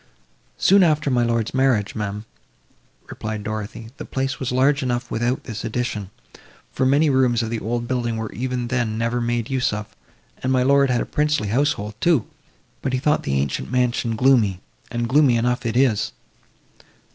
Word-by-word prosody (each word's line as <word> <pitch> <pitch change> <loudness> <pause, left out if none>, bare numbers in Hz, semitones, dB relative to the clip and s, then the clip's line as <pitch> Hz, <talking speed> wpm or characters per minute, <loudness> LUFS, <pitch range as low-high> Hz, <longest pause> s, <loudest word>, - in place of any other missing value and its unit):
"Soon 200 +1 +5
after 150 -4 +2
my 120 -1 +2
lord's 115 -1 0
marriage, 130 -6 +2
ma'am," 105 0 -4 0.8
replied 110 -1 -5
Dorothée. 110 +1 -5
"The - - -6
place 135 0 -2
was 130 - -2
large 135 +3 +3
enough 120 -2 -2
without 120 +3 -1
this 115 -3 -6
addition, 115 -4 -3 0.6
for 130 - +1
many 145 +4 +4
rooms 125 -3 +2
of 110 - -4
the 115 - -2
old 120 +2 -3
building 120 -3 -1
were 110 -1 -4
even 125 -1 -3
then 120 -4 -1
never 115 +1 0
made 120 0 -1
use 130 -1 +1
of, 105 0 -6 0.5
and 130 - 0
my 130 -1 +3
lord 140 +1 +4
had 125 -1 +1
a - - -2
princely 150 -8 0
household 110 -4 0
too; 165 -10 +3 0.6
but 130 - -2
he 130 - +1
thought 150 +3 +2
the 70 0 -1
ancient 70 -1 -2
mansion 120 -2 0
gloomy, 110 -6 +3 0.3
and 120 0 -2
gloomy 130 -1 +4
enough 125 +1 0
it 115 +1 -1
is!" 125 -6 +2
120 Hz, 175 wpm, -22 LUFS, 110-130 Hz, 0.8 s, Soon